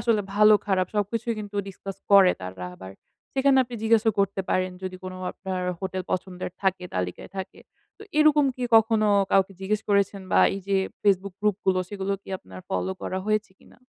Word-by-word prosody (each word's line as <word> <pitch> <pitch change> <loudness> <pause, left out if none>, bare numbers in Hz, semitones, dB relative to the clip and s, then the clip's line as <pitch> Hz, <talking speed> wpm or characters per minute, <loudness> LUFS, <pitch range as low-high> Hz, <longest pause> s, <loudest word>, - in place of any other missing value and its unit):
আসলে 230 -3 +2
ভালো-খারাপ 205 -3 +4
সবকিছুই 230 +3 -1
কিন্তু 205 -1 -7
ডিসকাস 195 0 -8
করে 195 -2 +7
তারা 90 0 -6
আবার। 95 +1 -10 0.4
সেইখানে 270 0 +4
আপনি 240 0 -9
জিজ্ঞাসও 225 0 +4
করতে 195 0 0
পারেন 185 0 +1
যদি 185 0 -5
কোন 185 - -5 0.2
আপনার 190 -1 -4 0.2
হোটেল 190 -1 -3
পছন্দের 185 0 -3
থাকে, 190 -1 0
তালিকায় 90 -1 -4
থাকে। 190 - -6 0.4
তো - - -11 0.2
এইরকম 305 -1 +5
কি 250 - -3
কখনো 220 -1 +3 0.2
কাউকে 195 0 +3
জিজ্ঞেস 210 +2 -1
করেছেন? 200 -1 +1
বা - - +6
এই 195 - -5
যে 195 - +3 0.3
Facebook 195 -2 +2
গ্রুপ 210 -2 +1
গুলো 185 -1 +3
সেগুলো 200 -1 -3
কি - - -18
আপনার 95 - -12
ফলো 95 0 -1
করা 185 - -2
হয়েছে 215 -1 0
কিনা? - - -21
195 Hz, 175 wpm, -25 LUFS, 185-215 Hz, 0.4 s, করে